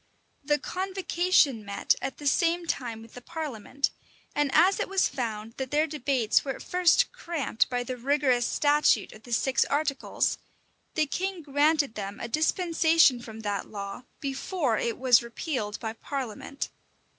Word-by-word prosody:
[*] - - -43
The 295 +1 +2
convocation 365 - +1
met 200 0 +1
at 270 - -4
the 295 - -10
same 340 +4 +2
time 235 -7 -3
with 225 - -16
the 245 - -10
parliament 280 -3 -3 0.4
and 290 -1 +1
as 380 +2 +5
it - - -1
was 390 -1 +3
found 225 -3 -4
that 265 -1 -3
their 300 +3 +2
debates 270 -7 +1
were 270 -2 -3
at - - -10
first 360 -2 +3
cramped 335 - -1
by 245 -1 -1
the 255 +1 -4
rigorous 260 -1 +2
statute 295 0 +3
of 215 - -14
the 240 - -13
six 260 +3 +2
articles, 285 -1 0 0.6
the 310 - +3
king 365 +4 -3
granted 290 -1 +2
them 200 -1 -6
a - - -4
dispensation 320 -1 +3
from 225 -1 -9
that 205 -2 -3
law, 200 +3 -7
before 275 - -1
it 235 - -1
was 250 -2 +5
repealed 235 -2 -4
by 220 -2 -4
parliament. 270 +1 -5
275 Hz, 160 wpm, -27 LUFS, 235-315 Hz, 0.6 s, as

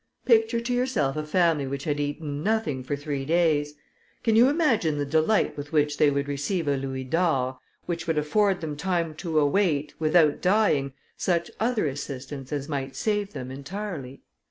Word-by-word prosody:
Picture 230 -1 +4
to 235 +1 -2
yourself 245 - 0
a 155 - -2
family 155 -3 +2
which 140 +1 -4
had 145 -1 -1
eaten 145 0 -3
nothing 205 -9 0
for 130 +3 -3
three 145 -1 -4
days: 150 -2 +1 0.5
can 225 -2 +3
you 240 +4 +7
imagine 235 - +2
the 145 - -1
delight 160 +8 +2
with 145 0 -7
which 150 -1 +1
they 150 - +6
would 140 0 -1
receive 145 +4 -2
a 140 - +2
louis 135 -1 -4
d'or, 130 -3 0 0.3
which 170 -1 -4
would 165 -2 0
afford 190 +6 +2
them 155 -2 -4
time 170 0 -1
to 160 0 -3
await, 150 -1 +2
without 155 -1 +3
dying, 180 -9 +2 0.2
such 170 -2 0
other 225 -4 +1
assistance 135 -1 -5
as 145 -1 -3
might 135 -3 -4
save 205 -1 -1
them 130 0 -6
entirely? 140 -1 -6
155 Hz, 175 wpm, -26 LUFS, 140-190 Hz, 0.5 s, you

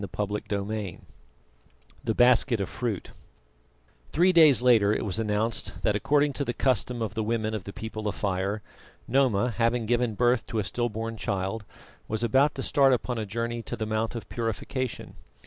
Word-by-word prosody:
CHAPTER 105 0 -2
XIII 100 -2 -3 1.0
THE 110 -2 -1
BASKET 120 -1 +4
OF 100 - -1
FRUIT 115 -5 -4 1.0
Three 180 +4 +4
days 155 -7 +6
later 115 -5 +5
it 110 - 0
was 100 +1 -2
announced 110 +1 -2
that 105 - +2
according 145 +6 +2
to 140 - -2
the 120 -3 -3
custom 125 -1 0
of 105 -3 -3
the 110 - -2
women 110 0 -1
of 105 -4 -4
the 100 - -6
People 110 0 -5
of 105 - -2
Fire, 100 +1 -2 0.4
Noma 125 -3 +2
having 115 +1 +1
given 120 -1 +1
birth 120 +2 +2
to 115 - -4
a 105 - +1
still 120 +5 -1
born 115 +1 -5
child, 100 0 -2 0.4
was 110 +1 -2
about 135 +6 +3
to 135 - -4
start 135 -2 +4
upon 125 -1 -1
a 110 - -3
journey 115 +3 -3
to 120 - -5
the 110 -2 -3
Mount 110 +2 -1
of 115 - -6
Purification. 120 +2 -3
115 Hz, 180 wpm, -27 LUFS, 105-125 Hz, 1.0 s, days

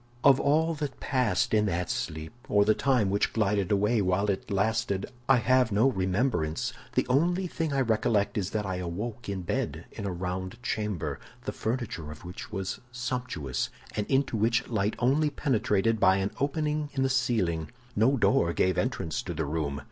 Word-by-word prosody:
"Of 135 -1 +7
all 160 +3 +2
that 145 -4 -4
passed 125 -10 +1
in 105 -1 +3
that 90 -1 -1
sleep, 80 +3 -4 0.2
or 100 0 +4
the 110 - +5
time 125 -6 +2
which 100 - +1
glided 100 -3 +1
away 105 +3 +3
while 100 +2 +2
it 95 - -5
lasted, 100 0 0 0.2
I 135 - +8
have 125 +1 +3
no 110 +7 +4
remembrance. 95 - 0 0.2
The - - +3
only 175 +8 +2
thing 165 -3 -2
I 135 -1 +1
recollect 110 -3 +1
is 100 -3 -1
that 105 0 -2
I 95 -1 -2
awoke 100 +7 -4
in 95 -2 -3
bed - - -2
in 100 - -5
a - - -1
round 90 +1 -4
chamber, 105 -8 -2 0.3
the - - -1
furniture 110 -9 -3
of 75 +3 -10
which 90 +5 -8
was 95 -2 -4
sumptuous, 125 - -3 0.3
and 105 - -1
into 135 -2 +1
which 115 +3 +2
light 110 -2 0
only 140 +5 +2
penetrated 115 -6 +1
by 95 -1 +5
an 95 +1 -1
opening 150 +1 0
in 135 -1 +1
the - - +3
ceiling. 110 -12 0 0.3
No 125 +6 +4
door 100 -5 +3
gave 95 +1 +2
entrance 80 -2 -1
to 85 - -5
the 80 +1 -1
room. 70 -1 -2
105 Hz, 180 wpm, -28 LUFS, 95-130 Hz, 0.3 s, I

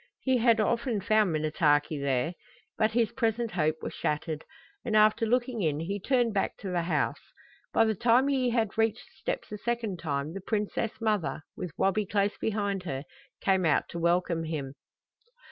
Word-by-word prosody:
He 260 -1 +2
had 230 -1 +4
often 235 +1 +1
found 215 -1 +3
Minnetaki 150 -1 +1
there. 140 +4 0 0.4
But 220 0 +1
his 230 -1 +2
present 230 -1 0
hope 155 -3 +1
was - - -4
shattered, 155 +1 -2 0.4
and 220 - -1
after 215 +1 +4
looking 245 -1 0
in 155 -4 0
he 195 +5 -3
turned 240 +1 +1
back 195 - -1
to 195 - -5
the 175 -1 +1
house. 170 - 0 0.5
By 225 - +4
the 220 - +2
time 240 +5 +3
he 265 -3 +2
had 225 -2 0
reached 225 +1 +1
the 380 - -25
steps - - -3
a 210 - -5
second 230 -5 -2
time 145 -1 -2
the 195 - -6
princess 215 +2 -2
mother, 210 -9 0
with 180 - -4
Wabi 195 +1 +1
close 200 +1 +1
behind 205 -3 -1
her, 135 -7 -4 0.4
came 190 -1 +2
out 155 -3 +2
to 170 - -5
welcome 170 -1 +1
him. 145 -4 -4
205 Hz, 180 wpm, -29 LUFS, 165-230 Hz, 0.5 s, had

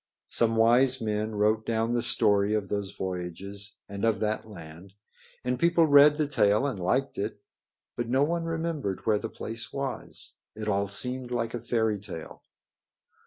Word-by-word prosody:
Some 115 -1 +2
wise 125 +3 +5
men 110 -1 -2
wrote 110 +1 +2
down 115 +1 0
the 120 - +1
story 105 -4 +3
of 100 -3 -2
those 100 -1 -2
voyages 95 +3 -4
and 100 0 -7
of 115 -1 +2
that 110 0 -2
land, 85 0 -11 0.5
and 125 0 -1
people 170 -1 +4
read 145 0 +7
the 155 - +1
tale 110 -3 +2
and 130 -8 -2
liked 130 +10 0
it, 105 +1 -3 0.6
but 120 -1 -3
no 130 +3 +3
one 165 +2 -1
remembered 160 - -3
where 105 -2 +2
the 115 - -5
place 115 +1 -6
was. 135 -2 -6 0.2
It 110 0 -6
all 100 -1 +1
seemed 125 +5 0
like 115 -2 -2
a 120 - -4
fairy 110 -3 0
tale. 85 -5 -9
110 Hz, 165 wpm, -27 LUFS, 100-130 Hz, 0.6 s, read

